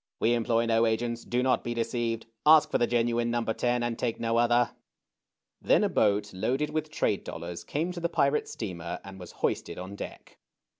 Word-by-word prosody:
We 115 - +3
employ 115 0 +1
no 115 0 +3
agents. 115 +1 -1
Do 125 +1 0
not 130 0 +2
be 120 0 -3
deceived. 115 -1 -2 0.2
Ask 155 0 +6
for - - +2
the 120 - +3
genuine 120 0 +1
No. 120 0 0
10, 120 +2 0
and 120 -1 -2
take 115 -2 -1
no 115 0 0
other." 120 +1 +3 0.9
Then - - +4
a - - +2
boat 105 -1 +1
loaded 130 +10 -1
with 155 0 -2
trade 105 -8 0
dollars 85 +1 -6
came 165 +5 -2
to 180 - -6
the 170 0 -1
pirate 140 -2 +1
steamer 90 -5 -5
and 95 0 -10
was 90 -2 -9
hoisted - - -1
on 95 +2 -7
deck. - - -9
115 Hz, 195 wpm, -28 LUFS, 110-125 Hz, 0.9 s, Ask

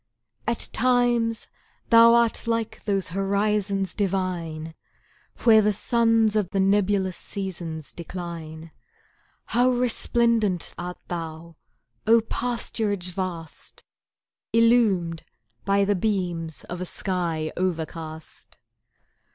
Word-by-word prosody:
At 235 0 +1
times 240 -2 +2 0.4
thou 230 0 +8
art 235 0 +1
like 230 -1 -2
those 195 -3 0
horizons 200 +1 0
divine, 175 -5 -2 0.7
Where 220 -2 +7
the 210 0 +2
suns 225 0 +2
of 205 -4 +1
the 195 - -1
nebulous 195 -1 +2
seasons 170 -6 -6
decline; 165 -2 -7 0.7
How 245 +2 +2
resplendent 235 -5 +1
art 180 +1 -6
thou 165 -1 -6 0.5
O 230 +1 +7
pasturage 220 -5 -2
vast, 175 -3 -6 0.7
Illumed 220 -8 +3 0.4
by 200 0 +3
the 205 - +2
beams 175 -5 -2
of 175 +1 -7
a - - -2
sky 170 -5 -2
overcast! 160 -3 -5
195 Hz, 95 wpm, -25 LUFS, 170-225 Hz, 0.7 s, thou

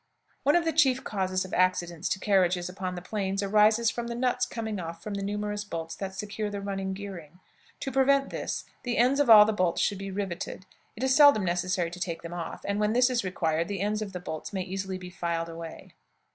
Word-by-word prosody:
One 290 +4 +3
of 345 -1 +3
the 325 - +1
chief 265 -5 +3
causes 185 -2 -1
of 185 - -10
accidents 175 -2 +1
to 190 - -1
carriages 180 -3 +2
upon 185 0 -4
the 175 - -7
plains 195 0 -2
arises 215 +3 +4
from 235 -1 -4
the 235 - -4
nuts 250 0 +1
coming 220 -4 -4
off 165 -1 -7
from 210 - -5
the 200 - -3
numerous 205 +1 -2
bolts 165 -5 -5
that 190 -1 -5
secure 210 +2 -4
the 205 0 -4
running 195 -1 -3
gearing. 180 -5 -9 0.4
To 270 - -3
prevent 275 +1 +3
this, - - -3 0.2
the 245 -1 -2
ends 255 +4 +4
of 285 -4 +2
all 210 -2 +10
the 220 - 0
bolts 180 -4 +1
should 200 -2 +1
be 195 0 -5
riveted; 190 -1 -4 0.3
it 230 - -5
is 265 0 +3
seldom 285 -9 +7
necessary 175 0 0
to 180 - -8
take 170 -2 -4
them 170 0 -7
off, 170 -2 -5
and 200 +1 -1
when 210 +1 +2
this 250 +1 +4
is 240 -3 0
required 165 -3 -1
the 200 -2 -3
ends 210 +1 0
of 205 -2 -4
the 180 - -5
bolts 160 -3 -6
may 190 -2 -2
easily 190 0 -4
be 180 -1 -9
filed 170 -1 -2
away. 165 0 -9
195 Hz, 230 wpm, -28 LUFS, 180-220 Hz, 0.4 s, all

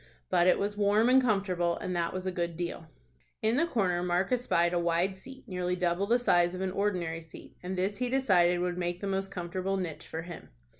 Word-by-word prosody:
But 175 -1 +4
it 185 - +5
was 205 +1 -2
warm 210 +3 +3
and 260 +1 +6
comfortable, 190 -7 0
and 180 - -4
that 170 -1 0
was 185 0 -5
a 185 - -1
good 170 -2 -3
deal. 170 -2 -4 0.6
In 220 +2 +2
the 330 +5 +2
corner 185 - 0
Mark 180 +3 0
espied 180 -9 +2
a 175 - +2
wide 170 +3 +1
seat 260 +7 -13
nearly 180 -2 -2
double 180 +2 0
the 235 +3 +4
size 175 -7 +2
of 185 - -5
an 190 -1 -1
ordinary 180 -5 -1
seat, 160 -1 -13
and 185 +1 -4
this 195 +2 -1
he 250 0 -1
decided 180 -9 +3
would 180 0 -2
make 175 0 -2
the - - -3
most 195 0 -2
comfortable 185 +1 -3
niche 175 -5 -5
for 160 0 -5
him. 175 0 -10
185 Hz, 220 wpm, -29 LUFS, 175-200 Hz, 0.6 s, and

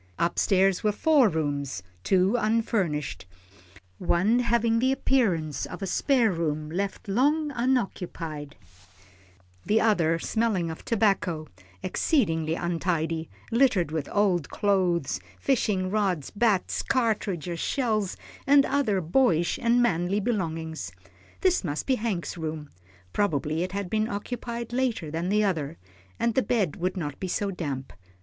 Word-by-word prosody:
Up 170 - 0
stairs 190 -1 +3
were 210 - +3
four 275 +1 +4
rooms, 145 - -2 0.2
two 190 +3 +3
unfurnished, 215 - 0 0.7
one 195 +7 +2
having 235 -1 +2
something 230 - +3
the 260 +2 +2
appearance 190 - +1
of 180 +3 -7
a - - 0
spare 240 +2 +2
room 155 -3 -2
left 195 +4 -3
long 290 +9 +2
unoccupied, 180 - -2 1.1
the 220 - +2
other 170 -7 +3
smelling 195 -3 0
of 160 - -9
tobacco, 195 -8 +1 0.4
exceedingly 165 - +1
untidy, 165 -2 -1 0.2
littered 230 - +3
with 155 -3 -3
old 185 -7 +1
clothes, 185 -7 +1 0.2
fishing 200 -8 +1
rods, 195 -8 0
bats, 205 -3 +1
cartridge 205 - -1
shells, 215 -6 0 0.3
and 280 0 +6
other 260 -9 +1
boyish 175 -1 +2
and 240 +1 +3
manly 185 -2 +1
belongings. 165 - -3 0.5
This 365 - +2
must 150 -4 -3
be 265 - +2
Hank's 210 -7 -2
room, 155 -2 -5 0.4
probably 155 -5 0
it 185 +1 -3
had 200 -1 -2
been 215 +3 0
occupied 235 +3 -5
later 240 -11 -1
than 165 +3 -2
the 210 +1 +3
other, 165 -6 -1 0.4
and 235 - +1
the 260 - +3
bed 210 - 0
would 185 +2 -2
not 145 -5 -4
be 190 - -3
so 200 +2 -1
damp. 140 -7 -5
190 Hz, 135 wpm, -26 LUFS, 165-230 Hz, 1.1 s, and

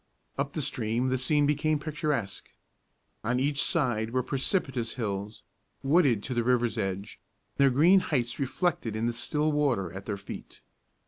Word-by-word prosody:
Up 140 0 -2
the 155 - -2
stream 120 +1 -1
the 130 - +1
scene 145 +3 +3
became 150 +1 +2
picturesque. 150 - -3 0.7
On 120 +3 +1
each 140 +2 +1
side 120 -8 +1
were 130 +2 0
precipitous 135 - -1
hills, 105 -2 -4 0.4
wooded 135 - +3
to 130 - -3
the 120 -1 +1
river's 120 -2 +2
edge, 100 -1 -3 0.4
their 140 -1 +5
green 165 +9 +6
heights 120 -9 -1
reflected 135 - -1
in 110 +1 -1
the 120 - 0
still 150 +6 0
water 125 - +1
at 95 +1 -8
their 100 -2 -2
feet. 95 - -10
130 Hz, 155 wpm, -28 LUFS, 110-145 Hz, 0.7 s, green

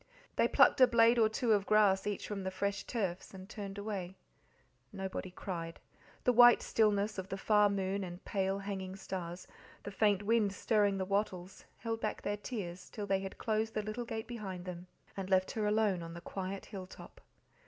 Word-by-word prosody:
They - - +4
plucked - - +5
a 255 - +9
blade 235 0 +5
or 220 -1 +5
two 225 +1 +1
of 200 -1 +1
grass 205 -2 +4
each 205 - -3
from 205 -2 -4
the 190 - -1
fresh 200 +1 -2
turfs, 195 -5 -3
and 190 0 -10
turned 200 -2 -7
away. 200 -3 -4 0.8
Nobody 190 -1 -5
cried; 170 -3 -6 0.4
the 250 - +3
white 240 0 +8
stillness 210 -2 +1
of 190 +1 -6
the 195 - -3
far 210 +1 +4
moon, 195 0 -1
the 175 -2 -6
pale, 195 -1 0
hanging 195 -1 -5
stars, 185 -2 -6 0.4
the 205 - -6
faint 205 -1 +2
wind 215 -2 +2
stirring 205 -1 +2
the 190 - -1
wattles; 195 -2 -2
held 225 -1 -4
back - - -3
their 205 - -1
tears 190 -5 -6
till 210 - -5
they 195 -1 +1
had 195 0 -7
closed 220 0 -1
the 215 - 0
little 215 +3 -4
gate 220 -1 -4
behind 195 -7 -6
them 180 0 -7 0.3
and 190 -1 -5
left 185 -1 +3
her 215 -2 -1
alone 210 -4 +2
on 165 0 -7
the 170 - -8
quiet 190 +2 -5
hill 190 -2 -8
top. - - -13
200 Hz, 195 wpm, -33 LUFS, 190-215 Hz, 0.8 s, a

